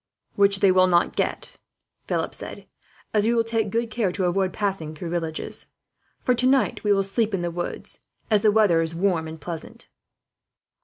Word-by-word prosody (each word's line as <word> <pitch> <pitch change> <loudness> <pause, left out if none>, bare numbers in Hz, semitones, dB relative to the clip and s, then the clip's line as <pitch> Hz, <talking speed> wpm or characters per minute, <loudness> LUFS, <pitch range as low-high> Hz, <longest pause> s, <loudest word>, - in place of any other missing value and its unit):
"Which 200 -1 +4
they 195 - +6
will 185 0 +5
not 175 -1 +2
get," - - -2 0.5
Philip - - -1
said, - - -5 0.5
"as 210 0 +2
we 235 - +2
will 230 - +3
take 225 -2 -1
good 230 +2 -1
care 215 -5 0
to 190 - -1
avoid 185 +1 +1
passing 190 -7 -3
through 165 +2 -6
villages. 165 -2 -3 0.6
For 250 - +3
tonight 255 +2 +2
we 210 - +2
will 195 -1 +3
sleep 210 +2 0
in 185 - -3
the 175 0 -2
woods, 175 +1 -3 0.3
as 210 -2 +4
the 215 -1 +4
weather 205 -6 +4
is 165 0 -2
warm 170 -3 0
and 160 0 -8
pleasant." 165 +2 -7
195 Hz, 185 wpm, -24 LUFS, 175-215 Hz, 0.6 s, they